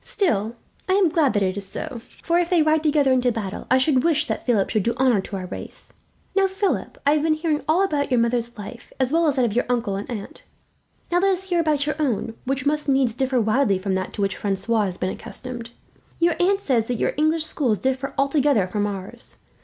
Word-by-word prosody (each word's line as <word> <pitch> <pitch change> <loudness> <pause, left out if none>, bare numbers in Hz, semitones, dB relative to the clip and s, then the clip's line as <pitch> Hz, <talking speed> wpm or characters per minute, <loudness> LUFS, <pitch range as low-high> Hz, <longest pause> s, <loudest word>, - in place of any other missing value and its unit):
Still, 225 - 0 0.3
I - - +4
am 385 -3 +4
glad 300 -4 +2
that 205 -2 +2
it 185 0 0
is 195 -1 -3
so; 250 +3 -5 0.2
for 340 +1 +2
if 350 -1 0
they 345 -4 +4
ride 310 0 +3
together 295 -3 +3
into 250 -1 +3
battle, 210 -4 -5
I 260 - +5
should 260 -1 +2
wish 315 -2 +2
that - - -4
Philip 215 -6 +2
should 215 - +2
do 235 +4 -1
honour 250 -5 +3
to 195 - -7
our 185 -1 -4
race. - - -9 0.4
"Now, 390 -1 +4
Philip, 385 +1 -2
I 285 - +5
have 305 - +2
been 315 0 +2
hearing 310 -1 -1
all 335 +5 +3
about 295 -7 0
your 250 -2 +3
mother's 235 0 0
life, 220 +3 -9
as 260 +2 +1
well 335 0 +3
as 290 - +2
that 255 -3 +2
of 220 - -1
your 245 - 0
uncle 230 -5 0
and 200 - -6
aunt. 215 -5 -7 0.7
Now 350 - +3
let 390 +2 +3
us 375 0 -1
hear 350 -1 +2
about 305 -3 +1
your 300 - -2
own, 240 -6 -1
which 265 +1 -2
must 300 0 0
needs 265 -4 +3
differ 260 +1 0
widely 220 -1 +2
from 190 +1 -2
that 185 0 -2
to 205 - -2
which 195 - -1
Francois 205 +2 0
has 185 -2 -4
been 185 - -1
accustomed. 245 -2 -7 0.5
Your 340 0 +3
aunt 390 +2 +2
says 240 - +1
that 245 - -1
your - - +1
English 310 +2 +2
schools 260 -8 0
differ 265 +3 -2
altogether 275 -6 +2
from 205 +2 -1
ours. 195 -1 -5
260 Hz, 235 wpm, -23 LUFS, 220-310 Hz, 0.7 s, I